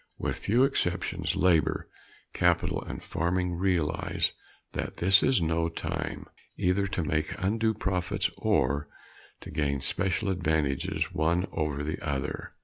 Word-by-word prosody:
With - - -2
few 120 +5 +3
exceptions, 90 -10 0
labor, 85 -5 +2 0.5
capital 90 -1 +2
and - - -7
farming 90 +2 0
realize 85 -3 +1 0.4
that - - -4
this 95 +3 +5
is 130 -10 +3
no 80 +1 +1
time 80 - -4 0.3
either 95 +2 +2
to 95 -3 -2
make 75 0 -1
undue 110 +3 +1
profits 95 -3 -1
or 70 +3 +1 0.5
to - - -9
gain 70 -2 0
special 95 - 0
advantages, 80 -7 0
one 85 +4 +2
over 75 -3 -1
the 80 +3 -3
other. 70 -4 -3
85 Hz, 130 wpm, -28 LUFS, 75-95 Hz, 0.5 s, this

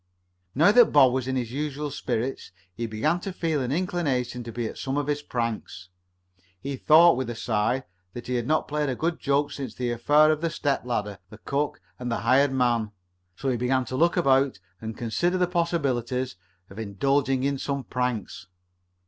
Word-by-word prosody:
Now 160 +9 +6
that 240 +1 +7
Bob 135 -4 +6
was 130 -1 -1
in 130 - -1
his 120 -3 -2
usual 145 +1 -3
spirits 125 -4 -3 0.2
he 115 +4 -4
began 150 +11 0
to 195 - -5
feel 165 -5 -1
an 125 0 -2
inclination 140 -8 -1
to 115 - -7
be 120 +1 -3
at - - -6
some 135 +1 -2
of 145 - 0
his 145 0 -1
pranks. 115 -8 -4 0.7
He 140 +5 -4
thought, 160 +3 +6
with 130 -2 -2
a 120 - -4
sigh, 115 +3 0 0.3
that 120 - -7
he 125 - -3
had 120 -1 -1
not 155 +1 +1
played 150 -1 -1
a 130 - -1
good 165 +5 -2
joke 140 +1 +1
since 135 -5 -6
the 125 -1 -2
affair 145 +6 +4
of 155 0 -1
the 165 - 0
step 145 -5 -1
ladder, 105 -5 -3
the 110 - -12
cook 140 +6 -2 0.2
and 125 -1 -4
the 115 - -1
hired 130 +4 +4
man. 120 -4 +1 0.5
So 135 - -2
he 125 - 0
began 125 +2 +1
to 130 - -5
look 170 +6 +2
about 135 - +3 0.2
and 110 0 -6
consider 175 +11 0
the 180 - +3
possibilities 135 - -1 0.4
of 100 - -9
indulging 130 +5 0
in 140 0 0
some 140 -1 -3
pranks. 120 -7 -3
130 Hz, 195 wpm, -26 LUFS, 120-150 Hz, 0.7 s, that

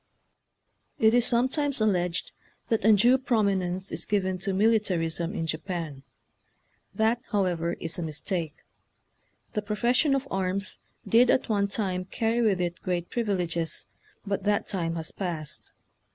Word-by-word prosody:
It 220 0 +4
is 245 0 +3
sometimes 260 +3 +1
alleged 180 -5 0 0.4
that 225 -3 +1
undue 220 +5 +6
prominence 195 -6 0
is - - -1
given 190 -3 0
to 195 +2 -2
militarism 190 -4 +1
in 165 - -1
Japan. 160 -3 -4 0.9
That, 225 +2 +1
however, 175 -5 0
is 165 +2 -5
a - - -2
mistake. 160 0 -3 0.9
The 210 - 0
profession 235 +7 +2
of 275 0 -2
arms 195 +1 -2 0.3
did 240 +2 +5
at 260 - +2
one 200 -2 +2
time 190 -3 -2
carry 225 +4 0
with 205 -5 +2
it 175 -1 -2
great 175 -1 -2
privileges, 180 -8 -1 0.4
but 200 -1 -2
that 205 0 +1
time 170 -4 -2
has 160 -1 -3
passed. 165 -6 -3
195 Hz, 135 wpm, -27 LUFS, 175-220 Hz, 0.9 s, undue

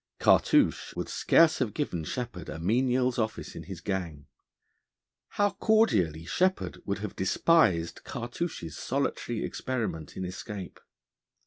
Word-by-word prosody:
Cartouche - - +3
would - - -3
scarce 165 -1 +4
have 120 -5 -1
given 90 - -2
Sheppard 105 - -5
a - - -5
menial's 125 +7 +1
office 110 -1 -3
in - - -6
his 95 -3 -8
gang. 85 -7 -3 1.1
How 205 0 +3
cordially 95 - +2
Sheppard 185 - 0
would 100 - 0
have 105 0 -6
despised 95 - +2
Cartouche's 120 - -5
solitary 130 -3 -2
experiment 110 - -4
in 95 - -3
escape! 95 +1 -7
105 Hz, 120 wpm, -28 LUFS, 90-130 Hz, 1.1 s, scarce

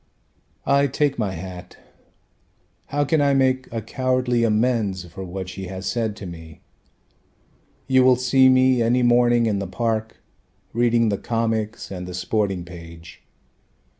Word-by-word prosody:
I 140 0 +3
take 140 0 0
my 100 -4 -1
hat: 90 +1 -9 1.1
how 145 0 0
can 155 +1 +2
I 140 -1 +3
make 130 -1 +1
a 115 -2 -4
cowardly 130 -1 0
amends 110 -4 0
For 90 +3 -9
what 95 +1 -6
she 95 0 -7
has 95 +1 -7
said 115 -3 -1
to 105 - -9
me? 80 -3 -10 1.2
You 130 -1 +4
will 130 0 +6
see 130 +1 +4
me 130 -1 +4
any 120 +2 +2
morning 120 -1 +4
in 105 -3 0
the 100 - -4
park 110 +2 -2 0.6
Reading 115 -1 +2
the 100 - -1
comics 115 -2 -2
and 90 -1 -6
the 90 - -6
sporting 95 -1 -1
page. 85 -1 -12
115 Hz, 145 wpm, -22 LUFS, 95-125 Hz, 1.2 s, will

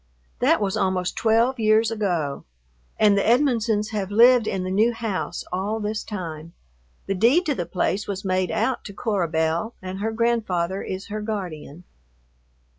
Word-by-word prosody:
That - - +3
was 200 -2 -1
almost 185 -1 0
twelve 230 +3 +2
years 220 +1 +3
ago, 175 -10 -2 0.5
and 210 -2 +5
the 200 - +2
Edmonsons 230 -4 +2
have 200 -3 -2
lived 235 +2 +5
in 185 - -2
the 185 - -3
new 220 +5 +3
house 225 -5 -3
all 200 +4 -1
this 210 0 -3
time. 165 -5 -7 0.5
The 195 - -1
deed 240 - +3
to 300 - +1
the 175 -10 -4
place 195 +3 -1
was 195 -1 -5
made 185 -1 0
out 260 -1 -1
to 200 - -8
Cora 200 -5 -1
Belle, 160 +7 -1
and 185 -1 -6
her 220 +2 -1
grandfather 215 -6 0
is 190 +3 -6
her 215 +1 -4
guardian.... 180 -7 -6
205 Hz, 165 wpm, -23 LUFS, 185-225 Hz, 0.5 s, and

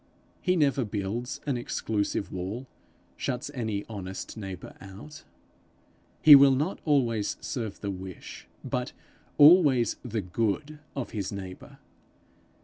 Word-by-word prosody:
He 180 -1 +2
never 140 -5 +2
builds 105 +3 -4
an 140 -4 0
exclusive 105 -4 -2
wall, 95 +8 -5 0.5
shuts 130 +3 -3
any 110 -6 -3
honest 95 -3 -7
neighbour 95 -4 -8
out. 100 +11 -11 1.0
He 155 - +11
will 140 -1 +8
not 150 +8 -1
always 120 -9 +1
serve 115 -5 -5
the 100 - -2
wish, 95 -1 -9 0.2
but - - -3 0.4
always 145 -6 +6
the 115 -3 -2
good 115 - -2 0.2
of 135 -3 -4
his 100 -4 -3
neighbour. 95 -2 -8
115 Hz, 120 wpm, -28 LUFS, 100-140 Hz, 1.0 s, He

